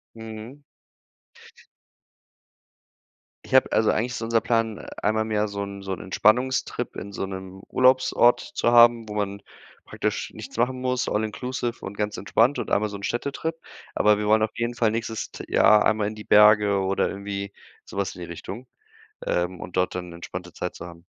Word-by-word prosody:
Mhm. 110 +5 -9 2.8
Ich - - -10
habe - - +5
also, - - +3
eigentlich 125 +3 -1
ist - - -5
unser 115 0 +1
Plan, 115 -2 0 0.2
einmal 110 +1 +1
im 110 - -6
Jahr 105 0 +1
so 100 0 -5
'n 100 0 -7
so 95 -1 -4
'n 90 - -6
Entspannungstrip 125 +7 +1
in 100 - -7
so 95 - -3
'nem 95 0 -8
Urlaubsort 130 -1 +4
zu 120 - -1
haben, 120 -1 +6
wo 105 - -6
man 100 -1 -3 0.4
praktisch - - -3
nichts - - -10
machen 125 +2 0
muss, 125 0 0
all 105 +1 0
inclusive 120 +2 -4
und 95 - -7
ganz 105 0 -2
entspannt 115 +7 +2
und - - -4
einmal 105 +1 +2
so 100 - -6
'n 100 - -12
Städtetrip. 140 +8 -2 0.4
Aber 105 0 +4
wir 105 - -2
wollen 110 +1 +4
auf 110 - -3
jeden 115 +1 -1
Fall 115 -2 +2
nächstes 115 -1 -4
t - - -8
Jahr 105 -1 +5
einmal 110 -1 +2
in 105 - -5
die 105 - -9
Berge 105 -1 +5
oder 95 0 +1
irgendwie 100 0 -5 0.3
so - - -12
was 100 - -2
in 90 - -10
die 85 - -6
Richtung, 95 +9 -8 0.6
ähm, 90 0 -1
und 90 - -8
dort 90 0 +1
dann 90 -1 -5
'ne 85 - -10
entspannte 90 +1 -8
Zeit 90 - -5
zu 85 - -8
haben. 85 -1 -13
105 Hz, 190 wpm, -25 LUFS, 100-115 Hz, 2.8 s, haben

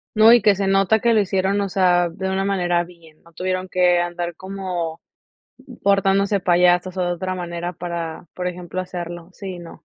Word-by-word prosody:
No, 220 +1 +7
y 240 -2 +6
que 210 - +6
se 195 0 -1
nota 195 +2 +3
que 235 +1 +2
lo 215 - +4
hicieron, 195 +1 0
o 200 - -2
sea, 180 -2 +3
de 190 +3 -4
una 190 0 -1
manera 175 -3 +1
bien. 170 -3 -18
No 170 - -21
tuvieron 185 +2 -2
que 180 -1 +3
andar 175 0 -3
como 185 -4 -5 0.8
portándose 195 0 +2
payasos 180 0 +3
o - - 0
de 175 - 0
otra 185 +2 -4
manera 175 0 -4
para, 170 -2 -5
por 180 - -5
ejemplo, 180 0 -5
hacerlo, 175 -1 -7
sí, 185 -2 -8
no. 170 - -13
180 Hz, 185 wpm, -21 LUFS, 175-195 Hz, 0.8 s, No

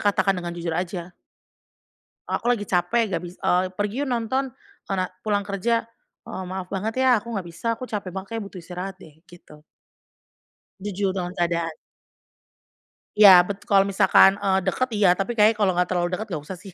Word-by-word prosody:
katakan 200 -1 +2
dengan 175 -2 -5
jujur 170 -1 -3
aja. 175 0 -4 1.1
"Aku - - -2
lagi 235 -4 +1
capek, 195 +4 +1
gak 170 -1 -1
bis" 175 +1 -9
"Eee, 180 +1 +2
pergi 210 +5 -2
yuk - - -5
nonton, 250 +2 -1 0.4
kona 190 -2 0 0.2
pulang 205 0 -1
kerja." 210 +4 0 0.4
"Eee, 190 - -6
maaf 185 0 -5
banget 210 +3 -2
ya - - +5
aku 235 - -13
nggak 190 -3 -4
bisa, 170 - -9
aku 255 - -7
capek 205 -6 -5
banget 190 +1 -6
kayaknya 225 - -4
butuh 185 - -10
istirahat 185 +2 -6
deh," 160 -5 -16
gitu. 150 -3 -16 1.2
Jujur 200 -1 -1
dengan 180 -1 -4
keadaan. 170 -1 0 1.4
Iya, 210 -1 +10 0.2
betul, 200 -1 -6
kalau 195 -1 +6
misalkan, 195 -1 +6
eee, 190 -1 +2
deket 255 +7 0
iya, 205 -2 +4
tapi 195 +3 -2
kayaknya 215 +2 +6
kalau 205 -3 +3
nggak 180 0 +1
terlalu 175 -1 +1
deket 210 +5 -3
nggak 155 -5 -4
usah 190 - -6
sih. 195 -2 -11
195 Hz, 180 wpm, -24 LUFS, 180-210 Hz, 1.4 s, Iya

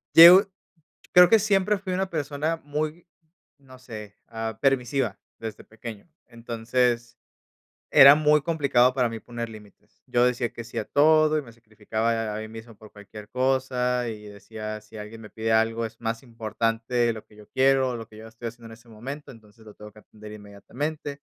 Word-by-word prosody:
Yo 180 +4 +10 0.6
creo 180 0 +8
que 225 +2 +5
siempre 205 0 +2
fui 190 -1 -5
una 190 +1 -1
persona 155 0 -2
muy 155 +3 -4 0.5
no 130 -2 -16
sé, 105 -5 -10
ah, 110 -1 -5
permisiva 130 -5 0 0.2
desde 110 -2 -8
pequeño. 110 +3 -10 0.2
Entonces, 120 0 -2 0.7
era 140 +1 +9
muy 150 0 +3
complicado 140 -6 +2
para 125 -3 +1
mí 115 0 -6
poner 115 0 -6
límites. 105 -2 -16
Yo 120 0 +3
decía 125 -1 0
que 120 - -8
sí 115 +1 -10
a 110 - -4
todo, 155 +3 +4
y - - -1
me 115 - -14
sacrificaba 110 0 -4
a 115 -2 -2
ahí 110 0 -5
mismo 115 +1 -11
por 110 0 -16
cualquier 105 0 -12
cosa, 125 -1 0
y 105 -1 -8
decía: 105 +1 -8
"Si 110 +1 -14
alguien 105 +2 -9
me 105 - -11
pide 110 +1 -3
algo, 115 +1 +2
es 115 +1 -10
más 115 +2 -3
importante 115 0 -3
de 120 -1 +3
lo 110 - -9
que - - -22
yo 105 -1 -16
quiero, 135 0 +3
o - - -2
de 120 - -4
lo 115 -1 -9
que 110 - -16
yo 110 +1 -11
estoy 115 +1 -8
haciendo 115 0 -10
en - - -12
ese 115 +1 -16
momento, 135 +7 -8
entonces 110 -1 -18
lo 105 - -13
tengo 105 0 -12
que 110 - -17
atender 105 0 -14
inmediatamente." 140 +8 -6
115 Hz, 190 wpm, -25 LUFS, 110-135 Hz, 0.7 s, Yo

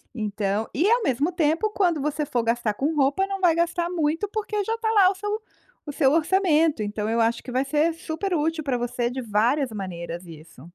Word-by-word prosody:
Então 210 -1 -2
e 355 +10 +2
ao 475 -1 +3
mesmo 285 +5 +1
tempo, 330 +4 +1
quando 350 -8 +1
você 300 +1 -1
for 245 -4 -1
gastar 230 -2 0
com 300 +7 -1
roupa, 285 +7 +2
não 390 0 -4
vai 345 -3 +5
gastar 340 +1 0
muito, 325 +2 0
porque 425 -1 -2
já 445 +3 -2
está 450 -1 -2
lá 395 -4 +6
o 390 - -2
seu 415 +3 -3 0.4
o 295 - -5
seu 275 -1 +2
orçamento. 325 - +2
Então 210 +1 -3
eu 230 - 0
acho 230 +1 +1
que 250 - -8
vai 260 +2 0
ser 305 +4 +1
super 330 +4 -4
útil 315 +1 -1
para 270 -3 0
você 240 0 -2
de 260 +1 -4
várias 240 +5 +1
maneiras 175 -4 -6
isso. 160 -5 -13
295 Hz, 210 wpm, -24 LUFS, 235-355 Hz, 0.4 s, lá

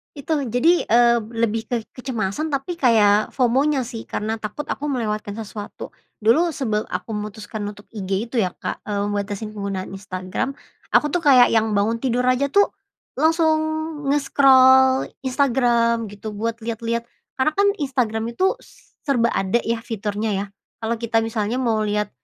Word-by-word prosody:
Itu. 300 +1 -1
Jadi, 295 +10 +3
eee, 235 +1 +5 0.2
lebih 225 -1 -1
ke 245 - -1 0.2
kecemasan 250 +2 -3
tapi 275 +6 -2
kayak 215 -5 +4
FOMO-nya 265 +3 +2
sih, 230 -1 -8
karena 220 +1 -3
takut 215 +8 -5
aku 290 - -3
melewatkan 215 -6 -2
sesuatu. 210 -1 -8 0.3
Dulu 310 +11 +4
sebelum 220 -6 -1
aku - - -5
memutuskan 210 +1 -6
untuk 205 0 -9
IG 195 0 -2
itu - - -7
ya, 185 -4 0
Kak, - - -5
eee, 200 -1 -1
membatasi 205 +1 -3
penggunaan 200 -2 -4
Instagram, 190 +5 -4 0.4
aku - - +5
tuh 350 - 0
kayak 255 -4 +7
yang 220 -1 +2
bangun 220 +3 +1
tidur 250 0 0
aja 255 +2 +2
tuh 405 +7 +3 0.5
langsung 320 +1 +3 0.6
nge-scroll 265 -2 +5 0.2
Instagram 240 -3 +2
gitu 205 +1 -7
buat 225 +2 -3
liat-liat. 230 +1 -2 0.4
Karena 265 +4 +2
kan 400 +1 +3
Instagram 235 -5 -1
itu 375 +8 +2
s - - -21
serba 235 -4 +2
ada 195 +4 +1
ya 230 0 -1
fiturnya 215 -1 -3
ya. 195 +1 -2 0.4
Kalau 225 +1 -1
kita 225 -1 +1
misalnya 225 0 -2
mau 225 -3 +1
liat, 210 0 -1
230 Hz, 155 wpm, -22 LUFS, 210-260 Hz, 0.6 s, kayak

